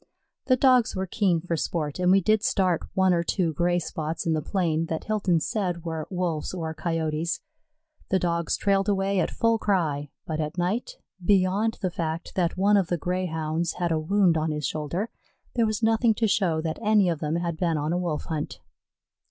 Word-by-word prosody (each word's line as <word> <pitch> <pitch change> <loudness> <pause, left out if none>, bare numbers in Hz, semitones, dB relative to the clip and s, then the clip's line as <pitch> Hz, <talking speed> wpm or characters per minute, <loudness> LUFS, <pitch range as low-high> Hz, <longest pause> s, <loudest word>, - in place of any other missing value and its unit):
The 255 - +5
Dogs 255 -4 +4
were 190 0 -1
keen 185 -3 +1
for 170 0 -2
sport, 155 -1 -2
and 180 0 +3
we 195 +1 +5
did 215 +3 +3
start 185 -6 +1
one 190 -1 +4
or 170 - +2
two 170 -1 0
gray 175 +3 +1
spots 160 -1 -3
in 165 - +2
the 155 - 0
plain 165 -1 0
that 160 -1 -3
Hilton 200 -6 +1
said 175 -1 -2
were 160 -2 -4
Wolves 180 -3 -2
or 160 -3 -3
Coyotes. 165 0 -2 0.7
The 190 - +3
Dogs 170 -2 0
trailed 195 0 +1
away 195 -1 +1
at 170 - +1
full 230 -1 +1
cry, 155 -9 0 0.2
but 155 -1 -3
at 155 +3 -3
night, 220 - -1 0.3
beyond 200 +4 +2
the 185 - 0
fact 165 -1 -4
that 175 -2 0
one 205 +2 +4
of 190 -4 +2
the 175 - 0
Greyhounds 170 -2 -2
had 175 -1 -1
a 160 - +2
wound 180 +1 +3
on 155 +1 -1
his 150 -2 -2
shoulder, 170 +8 -3 0.4
there 230 -2 +2
was 215 +1 -2
nothing 225 0 +3
to 225 +1 +1
show 175 -6 +1
that 160 -1 -3
any 210 -3 +4
of 165 -3 0
them 155 0 -1
had 170 -1 -1
been 165 -1 0
on 150 +3 -1
a - - +1
Wolf 170 -4 -2
hunt. 155 -2 -4
175 Hz, 200 wpm, -26 LUFS, 160-195 Hz, 0.7 s, The